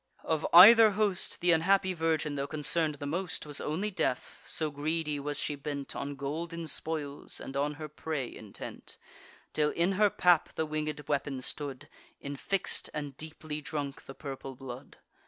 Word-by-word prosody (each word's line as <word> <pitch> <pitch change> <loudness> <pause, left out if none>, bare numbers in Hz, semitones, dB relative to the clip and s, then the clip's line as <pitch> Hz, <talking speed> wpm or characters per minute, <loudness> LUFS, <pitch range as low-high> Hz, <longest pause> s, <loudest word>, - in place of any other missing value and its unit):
Of 160 -1 0
either 220 +6 +10
host, 205 -4 +1
Th' 175 0 +4
unhappy 185 +3 +3
virgin, 160 -3 0
tho' 140 0 -2
concern'd 155 +1 +1
the 145 - -7
most, 170 +3 -2
Was 145 -1 -2
only 185 +8 -2
deaf; 130 -8 -2
so 155 -2 +1
greedy 150 +1 -2
was 145 +1 -3
she - - 0
bent 140 -1 -5
On 140 0 -4
golden 165 +5 -4
spoils, 150 -2 -3
and 135 - -7
on 145 +1 0
her 155 +1 -6
prey 150 -3 -4
intent; 105 -2 -8 0.6
Till 150 -1 +2
in 170 +5 +1
her 205 +2 +4
pap 180 -4 +3
the 160 - 0
winged 150 -1 -3
weapon 140 -2 -1
stood 140 -3 -5 0.3
Infix'd, 145 +7 -1
and 145 -3 -4
deeply 155 0 -6
drunk 145 -2 -4
the 135 - -9
purple 135 -2 -7
blood. 130 +1 -9
150 Hz, 160 wpm, -30 LUFS, 140-165 Hz, 0.6 s, either